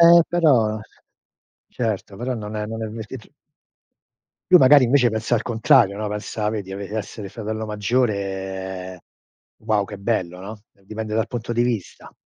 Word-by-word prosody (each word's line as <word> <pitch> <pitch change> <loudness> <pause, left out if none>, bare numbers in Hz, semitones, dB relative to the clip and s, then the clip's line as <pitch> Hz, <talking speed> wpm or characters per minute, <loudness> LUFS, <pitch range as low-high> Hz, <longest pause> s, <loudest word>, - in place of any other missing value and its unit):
Ehm, 170 0 +9
però 130 -11 +3 0.9
certo, 110 -4 -3
però 125 +3 -2
non 110 -2 -6
è 105 0 -2
non 115 +1 -5
è - - -2
avvertit 110 +2 -8 1.2
Lui 180 -1 +8
magari 135 +1 +7
invece 125 0 +4
pensa 110 +1 -1
al 115 - +1
contrario, 110 -4 +3
no, 105 0 -3
pensa 105 +1 -3
vedi, 100 -3 -5
ave 100 0 -6
essere 105 -1 -5
fratello 110 +1 -4
maggiore: 95 -4 -2 0.6
"Wow, 110 -2 +2
che 105 - -8
bello, 95 -4 -2
no", 105 +3 -8 0.2
dipende 110 +1 -5
dal 110 0 +1
punto 120 -1 -4
di 120 - +3
vista. 120 -6 -3
110 Hz, 150 wpm, -22 LUFS, 100-120 Hz, 1.2 s, Ehm